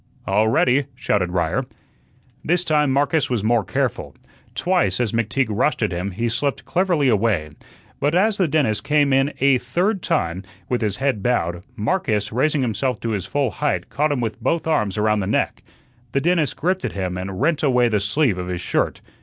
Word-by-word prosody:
"All 110 +1 +2
ready!" 125 +4 +2
shouted 95 -7 0
Ryer. 85 -3 -1 0.8
This 175 +2 +1
time 150 -3 +2
Marcus 145 +3 +1
was 120 -5 -1
more 115 0 +2
careful. - - -2 0.4
Twice, 180 -6 +1
as 120 -4 0
McTeague 115 +2 0
rushed 125 +4 +1
at 105 - 0
him, 90 +3 -3
he 115 +5 -2
slipped 130 +4 -1
cleverly 175 -5 +1
away. 105 -9 +1 0.5
But 145 +3 +1
as 205 +3 +3
the 185 - +3
dentist 140 -8 +1
came 145 -2 +2
in 135 +2 +3
a 135 -1 +4
third 175 - -1
time, 85 - -1 0.3
with 125 -1 -1
his 105 -3 -1
head 135 -6 0
bowed, 85 -7 0
Marcus, 110 - -1
raising 140 +4 +1
himself 125 +1 -1
to 115 - -2
his 100 -4 -2
full 140 -2 0
height, 150 -1 -2
caught 150 +1 +1
him 135 -4 -1
with 115 +1 -4
both 160 +7 0
arms 110 -12 0
around 105 0 +2
the 95 - -2
neck. 105 - 0 0.5
The 140 - +1
dentist 165 -2 +1
gripped 185 +3 0
at - - -3
him 95 -2 -3
and 95 +1 -5
rent 155 +2 +1
away 125 -4 +3
the 110 -3 +1
sleeve 105 0 +1
of 90 - -4
his 90 -1 -3
shirt. - - -1
125 Hz, 190 wpm, -21 LUFS, 105-150 Hz, 0.8 s, a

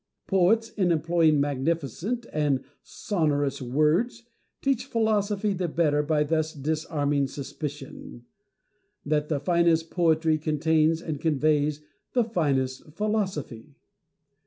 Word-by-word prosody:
Poets, 210 +4 +2
in 185 -4 +1
employing 165 -1 +3
magnificent 160 - -2
and 145 -4 +1 0.2
sonorous 145 - -1
words, 155 - +1 0.4
teach 270 -2 0
philosophy 210 -3 0
the 180 -1 -2
better 150 -2 +1
by 150 0 +1
thus 155 +1 -1
disarming 145 -1 -1
suspicion 140 -3 -7 0.8
that 150 0 0
the 150 -3 0
finest 165 +1 +2
poetry 160 -2 +2
contains 160 +1 +1
and 155 -5 -4
conveys 150 -1 +1 0.3
the 245 - +3
finest 145 - -1
philosophy. 175 - -3
155 Hz, 105 wpm, -26 LUFS, 145-180 Hz, 0.8 s, employing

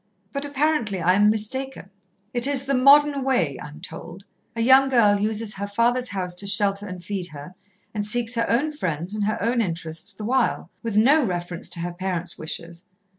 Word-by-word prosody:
But 280 +1 -2
apparently 285 -8 0
I 175 +2 +3
am 205 +2 +4
mistaken. 220 0 -2 0.4
"It 240 +1 +2
is 275 -1 0
the 275 - 0
modern 280 +2 +5
way, 180 - 0
I - - -7
am 150 - -13
told. 170 +4 -8 0.3
A 230 - -2
young 265 +3 +6
girl 210 -6 +4
uses 215 +1 -2
her 200 +1 -5
father's 240 +4 +1
house 185 -5 -3
to 200 - -3
shelter 200 0 +1
and 180 -1 -8
feed 195 -3 -3
her, 150 +2 -10 0.4
and 210 -2 -2
seeks 230 +3 0
her 230 -1 -1
own 280 +7 +1
friends 180 - -3
and 210 -1 -1
her 215 - -1
own 235 +1 +1
interests 170 +1 -2
the 210 - -7
while, 255 +2 0
with 225 -3 -2
no 280 +8 +5
reference 175 -4 -3
to 170 - -3
her 175 0 -4
parents' 175 -1 -2
wishes. 170 +2 -7
210 Hz, 195 wpm, -23 LUFS, 180-250 Hz, 0.4 s, young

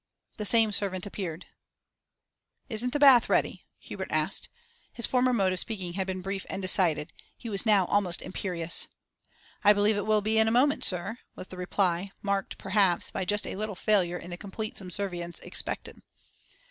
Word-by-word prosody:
The 210 -2 -1
same 225 -1 +4
servant 195 -2 -1
appeared. 185 -5 -6 1.2
'Isn't 245 +2 -2
the 290 - 0
bath 270 -5 +7
ready?' - - 0
Hubert - - -7
asked. - - 0 0.4
His 235 - 0
former 255 0 +2
mode 195 -6 +2
of 185 - 0
speaking 185 -6 -4
had 190 +1 -2
been 185 -1 -4
brief 195 0 -4
and 190 - -3
decided; 175 -5 +2 0.2
he 235 - -8
was 200 +3 +2
now 200 -4 +5
almost 185 -3 0
imperious. 170 -3 0 0.8
'I 205 - +7
believe 205 +1 +2
it 205 - -3
will 215 -1 +3
be 220 +2 +1
in 220 - +4
a - - +3
moment, 260 +5 +3
sir,' 195 +6 0 0.2
was 185 - -9
the 185 - -9
reply, 180 0 0
marked, 200 -1 -2
perhaps, 195 -3 +1
by 190 - -3
just 205 +3 0
a - - -5
little 210 0 -3
failure 180 -3 +1
in 175 0 -9
the 175 - -5
complete 215 +3 -6
subservience 180 -2 -4
expected. - - -4
200 Hz, 175 wpm, -28 LUFS, 180-215 Hz, 1.2 s, bath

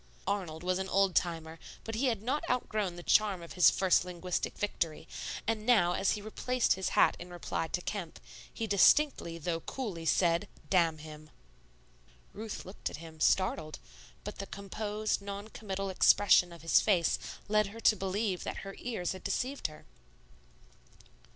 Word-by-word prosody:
Arnold 180 -5 -3
was 185 +1 0
an 190 0 -3
old 195 -1 +3
timer, 165 -2 -1 0.2
but 225 - -6
he 250 +5 +1
had 225 -4 -1
not 265 +6 -1
outgrown 215 -7 -1
the 175 - -9
charm 200 -4 +3
of 170 - -9
his 180 - +7
first 190 -3 +3
linguistic 180 0 -3
victory; 170 -6 -2 0.4
and 220 -1 -1
now 215 -7 +4
as 195 - +2
he 205 - -5
replaced 250 +3 +1
his 190 0 -2
hat - - +5
in 175 - -9
reply 175 -2 -3
to 180 +2 -3
Kemp, 180 -4 -5 0.3
he 225 - -3
distinctly 200 - +4
though 165 +1 -2
coolly 180 -6 -5
said, 170 -1 +2 0.2
"Damn 170 -4 +3
him." 155 0 -11 1.0
Ruth 215 0 -6
looked 185 - -5
at - - -8
him, 160 0 -11
startled; 160 -5 +1 0.5
but 210 - -7
the 195 - -5
composed, 210 +1 -3
non 200 +1 -6
committal 195 -3 -4
expression 185 -1 +5
of 170 -2 -12
his 165 - +5
face 180 -6 +2 0.3
led 210 0 +3
her 215 +3 -10
to 215 - +5
believe 195 0 -2
that - - -4
her 195 - -6
ears 220 -8 -3
had 185 - -7
deceived 255 +8 -1
her. 155 0 -14
190 Hz, 165 wpm, -31 LUFS, 170-215 Hz, 1.0 s, his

